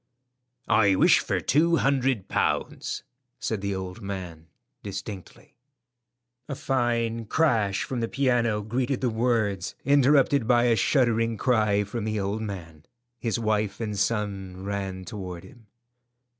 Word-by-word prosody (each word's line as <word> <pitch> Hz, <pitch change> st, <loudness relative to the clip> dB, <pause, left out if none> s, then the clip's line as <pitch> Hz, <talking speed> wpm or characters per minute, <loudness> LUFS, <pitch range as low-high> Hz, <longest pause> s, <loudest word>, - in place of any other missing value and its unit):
"I 100 Hz, -3 st, +4 dB
wish -, -, +5 dB
for -, -, -1 dB
two 165 Hz, +5 st, +3 dB
hundred 135 Hz, -, +1 dB
pounds," -, -, -1 dB, 0.4 s
said 110 Hz, -3 st, -2 dB
the 100 Hz, -1 st, -2 dB
old 95 Hz, +2 st, -6 dB
man 90 Hz, -5 st, -6 dB, 0.3 s
distinctly. 100 Hz, 0 st, -8 dB, 0.9 s
A 140 Hz, -, -3 dB
fine 115 Hz, -3 st, 0 dB
crash 110 Hz, -8 st, +1 dB
from 130 Hz, -, -4 dB
the 115 Hz, -, -1 dB
piano 120 Hz, -5 st, +1 dB
greeted 125 Hz, +4 st, -1 dB
the 125 Hz, -2 st, +1 dB
words, 110 Hz, -5 st, 0 dB
interrupted 140 Hz, -2 st, +4 dB
by 120 Hz, -1 st, +4 dB
a 120 Hz, -1 st, +4 dB
shuddering 115 Hz, 0 st, +2 dB
cry 105 Hz, -4 st, +2 dB
from 105 Hz, +2 st, -4 dB
the 110 Hz, -1 st, -1 dB
old 100 Hz, +3 st, -2 dB
man. 85 Hz, -8 st, -7 dB, 0.4 s
His 115 Hz, -2 st, -1 dB
wife 110 Hz, -2 st, -1 dB
and 110 Hz, -3 st, -3 dB
son 100 Hz, -3 st, -2 dB
ran 95 Hz, -2 st, -4 dB
toward 90 Hz, -2 st, -7 dB
him. 120 Hz, -5 st, -16 dB
110 Hz, 130 wpm, -26 LUFS, 100-120 Hz, 0.9 s, wish